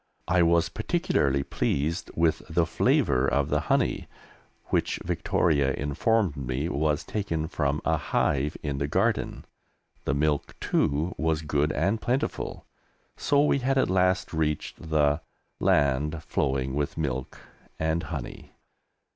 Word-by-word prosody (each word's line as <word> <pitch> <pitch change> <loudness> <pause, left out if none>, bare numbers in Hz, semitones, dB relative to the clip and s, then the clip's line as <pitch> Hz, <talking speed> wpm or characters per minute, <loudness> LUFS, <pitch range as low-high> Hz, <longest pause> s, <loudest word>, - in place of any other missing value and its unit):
I 90 0 +3
was 85 0 +4
particularly 70 -1 0
pleased 75 +4 -1
with 80 -1 +2
the - - +2
flavour 65 +2 +2
of 70 +2 +1
the - - +2
honey, - - +1 0.6
which - - +1
Victoria 70 -5 +1
informed 85 +5 +1
me 70 +3 -2
was 75 -2 0
taken 85 -7 -2
from 75 -3 -1
a 80 0 +2
hive 75 +1 0
in 70 -2 -2
the 70 - 0
garden. - - 0 0.6
The 65 - +1
milk, 75 0 0
too, 75 +6 0
was 80 0 0
good 75 0 +1
and 100 +6 0
plentiful, 125 +3 -2 0.5
so 145 0 +2
we 140 - +2
had 135 +1 +1
at 130 - +2
last 90 -1 +2
reached 80 0 -2
the 75 0 +2 0.4
"land 75 +3 +2
flowing 65 -2 -1
with 75 0 -2
milk 65 -5 -3 0.4
and 80 +1 0
honey." 75 -5 -7
75 Hz, 130 wpm, -27 LUFS, 70-85 Hz, 0.6 s, was